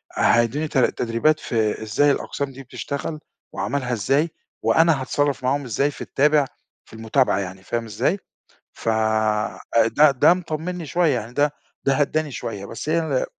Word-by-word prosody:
هيدّوني 120 +7 +2
ت 150 - -3
تدريبات 125 +5 +2
في 110 -2 -1
إزاي 140 +7 +3
الأقسام 140 0 -3
دي 135 +1 -10
بتشتغل 140 +4 -5 0.3
وعملها 125 -2 -2
إزاي 135 +9 +1 0.3
وأنا 165 -4 +4
هاتصرّف 140 0 0
معاهم 140 +2 +1
إزاي 140 +5 0
في - - -12
التابع، 150 0 +3 0.4
في - - -19
المتابعة 110 0 +1
يعني 95 -1 -6
فاهم 115 +3 -3
إزاي؟ 115 - 0 0.5
ف - - -3 1.1
ده 150 -1 +7
ده 135 +6 +5
مطمّني 170 0 -4
شوية، 160 0 +2
يعني 115 +3 -9
ده 145 +1 +2 0.3
ده 135 - +3
هدّاني 150 +1 0
شوية 105 -5 -5
بس 115 +8 -6
هي 165 - +1
140 Hz, 150 wpm, -22 LUFS, 115-155 Hz, 1.1 s, ده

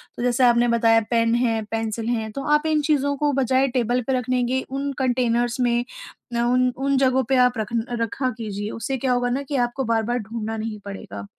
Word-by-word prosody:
तो 240 - -5
जैसे 250 +1 +2
आपने 240 0 +4
बताया 230 -1 +4
पेन 230 -1 +2
है, 230 -2 +1
पेंसिल 225 0 -2
हैं 220 -2 -2
तो 275 - -5
आप 300 +1 0
इन 310 -1 +2
चीज़ों 285 -2 +1
को 295 +1 +1
बजाए 265 0 +2
टेबल 245 -1 0
पे 265 - +1
रख 250 - -3
के 255 +1 +1
उन 275 +1 -3
कंटेनर्स 245 -2 0
में 240 -1 +1 0.6
उन 250 +1 +3
उन 275 +1 +1
जगहों 260 0 +3
पे 265 - +3
आप 250 -1 0
रख 215 -2 -2 0.3
रखा 255 +3 -1
कीजिए 205 -2 -4
उससे 265 +3 -3
क्या 255 +1 -1
होगा 245 0 0
ना 255 +3 -1
कि 280 +1 -5
आपको 240 +3 -4
बार-बार 230 0 0
ढूँढ़ना 225 0 -5
नहीं 215 -1 -4
पड़ेगा। 100 - -7
245 Hz, 205 wpm, -23 LUFS, 230-265 Hz, 0.6 s, आपने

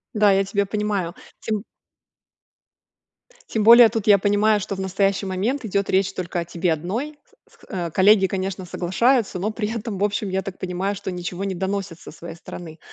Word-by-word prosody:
Да, 210 -1 +5
я 195 0 +2
тебя 200 +1 0
понимаю. 200 -4 -2 0.3
Тем 215 -2 -2 1.9
тем 220 - 0
более 235 +1 +9
тут 220 -2 -4
я 205 -1 +7
понимаю, 205 +2 +2
что 195 0 -4
в - - -8
настоящий 195 +1 0
момент 215 +9 -2
идет 200 -1 -1
речь 190 0 +2
только 175 -1 -3
о 170 - -3
тебе 170 0 0
одной. 225 - -4 0.3
С - - -24
с 175 -5 -4
коллеги, 195 +1 +5
конечно, 190 0 -3
соглашаются, 200 +6 +1
но 200 +4 -2
при 215 -1 -3
этом 225 -3 -4
в - - 0
общем 205 0 -1
я 190 +1 -1
так 190 -1 -7
понимаю, 185 +2 -3
что 195 -1 -5
ничего 180 +1 -5
не 195 -1 -2
доносят 190 -2 -3
со - - -11
своей 165 +1 -9
стороны. 165 -1 -10
195 Hz, 185 wpm, -22 LUFS, 185-210 Hz, 1.9 s, более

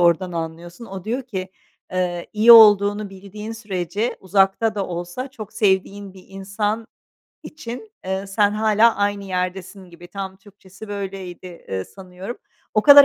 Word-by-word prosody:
oradan 175 +1 +3
anlıyorsun. 170 +5 -6
O 190 -2 -8
diyor 245 +5 -2
ki, 190 -6 -5 0.4
eee, 175 -1 -1
"İyi 220 +2 +8
olduğunu 205 -2 +7
bildiğin 200 +3 -8
sürece 205 0 -3
uzakta 195 +3 +2
da 200 -2 -2
olsa 175 +9 -5
çok 215 -6 -9
sevdiğin 200 -2 0
bir 185 - -14
insan 205 +3 -3 0.6
için, 305 - -8
eee, 190 +1 -2
sen 205 +1 +2
hâlâ 215 +2 +3
aynı 205 0 0
yerdesin." 185 0 -4
gibi 175 +1 -13
tam 190 0 -6
Türkçesi 200 +1 -14
böyleydi, 195 -3 -6 0.2
eee, 95 -1 -2
sanıyorum. 190 +4 -9 0.4
O 215 - +3
kadar 285 +1 +10
195 Hz, 145 wpm, -22 LUFS, 185-215 Hz, 0.6 s, kadar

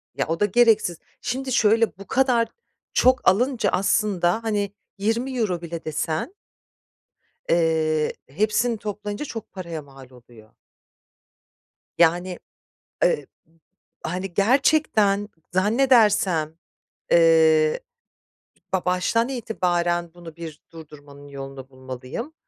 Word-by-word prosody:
Ya, 140 - -1
o 165 +1 -2
da 205 - +4
gereksiz. 215 -6 +3 0.2
Şimdi 260 +1 -3
şöyle, 225 -2 +3
bu 195 -1 -11
kadar 250 -3 +2 0.5
çok 255 0 +3
alınca 230 +1 +1
aslında, 195 +1 +1
hani, 205 -2 -1 0.2
€20 225 -3 -1
bile 170 -1 -7
desen 155 - -2 1.2
eee, 160 -2 +1 0.2
hepsini 215 - 0
toplayınca 210 +3 -5
çok 225 -6 -8
paraya 170 -5 -6
mal 135 -2 -15
oluyor. 120 -3 -17 1.5
Yani, 175 +2 +2 0.6
eb - - +2 0.8
hani, 180 +2 -4
gerçekten 215 - +2 0.2
zannedersem, 205 - +3 0.5
eee, 160 -2 +5 0.9
ba 185 - 0
baştan 185 +7 +1
itibaren 175 -8 -1
bunu 170 -2 -12
bir 160 -3 -9
durdurmanın 145 -3 -13
yolunu 135 -1 -9
bulmalıyım. 130 - -7
185 Hz, 95 wpm, -23 LUFS, 160-225 Hz, 1.5 s, eee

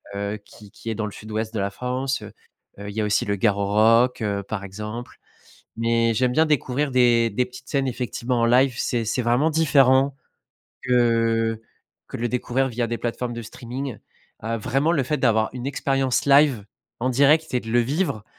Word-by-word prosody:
heu, 100 +1 -3
qui 105 0 -16
qui 115 - -8
est - - -3
dans 110 0 -2
le - - -7
sud-ouest 110 +2 -5
de 110 - -2
la 100 0 0
France, 130 +4 -3
heu, - - -10 0.6
il - - -6
y 110 - 0
a - - 0
aussi 105 0 +1
le 100 - 0
Garorock, 110 +4 +3 0.2
par 105 -3 -4
exemple 105 +5 -7 0.6
mais 115 0 +2
j'aime 125 +2 +2
bien 160 +5 +4
découvrir 145 -1 0
des 120 -2 +4
des 125 +4 0
petites 125 0 -13
scènes, 135 -2 0
effectivement, 125 0 -2
en - - +3
live, 125 +2 +3
c'est 120 -2 -1
c'est 115 +3 -1
vraiment 120 +6 +2
différent 140 -3 +4 0.7
que 115 -2 +1 0.5
que - - -6
de - - -6
le 120 - +1
découvrir 125 +2 0
via 120 -1 -2
des 120 - -2
plateformes 120 +1 -3
de 120 - -6
streaming, 125 +3 -7 0.4
heu, 115 +1 -2
vraiment 135 +8 0
le 150 -5 +1
fait 150 +4 -2
d'avoir 110 -3 +2
une 125 0 -6
expérience 135 -2 0
live 140 -6 +4 0.4
en 130 +2 0
direct 145 +5 +3
et 125 - +2
de 115 - -11
le 120 +1 +4
vivre, 130 - -1
120 Hz, 190 wpm, -23 LUFS, 110-130 Hz, 0.7 s, bien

